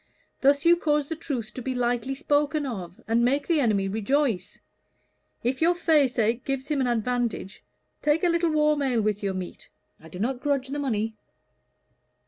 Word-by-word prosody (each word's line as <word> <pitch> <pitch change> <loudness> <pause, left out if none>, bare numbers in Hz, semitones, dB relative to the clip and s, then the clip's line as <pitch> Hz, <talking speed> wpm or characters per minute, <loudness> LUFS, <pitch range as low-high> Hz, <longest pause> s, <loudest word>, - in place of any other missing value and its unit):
Thus 280 +2 +3
you 345 +1 +6
cause 295 -4 0
the 320 - -2
truth 255 -9 -5
to 255 - -6
be 260 +1 -3
lightly 245 +1 -1
spoken 290 +2 +1
of, 185 -9 -6
and 230 +1 +2
make 275 +4 +2
the 335 -3 +2
enemy 210 -7 +2
rejoice. 220 -1 -1 0.8
If 260 +4 -1
your 345 +2 +4
faceache 260 -8 +2
gives 270 0 -3
him 290 -3 +1
an 255 - +1
advantage, 240 -3 -2 0.4
take 300 +4 +2
a 355 - +4
little 340 0 +2
warm 300 -1 +2
ale 250 -5 +1
with 210 -1 0
your 195 -2 -2
meat 185 -1 -7 0.3
I 160 - -14
do 180 - -9
not 245 +6 -1
grudge 275 -3 0
the 290 +1 -3
money." 225 -5 -1
260 Hz, 175 wpm, -26 LUFS, 225-295 Hz, 0.8 s, you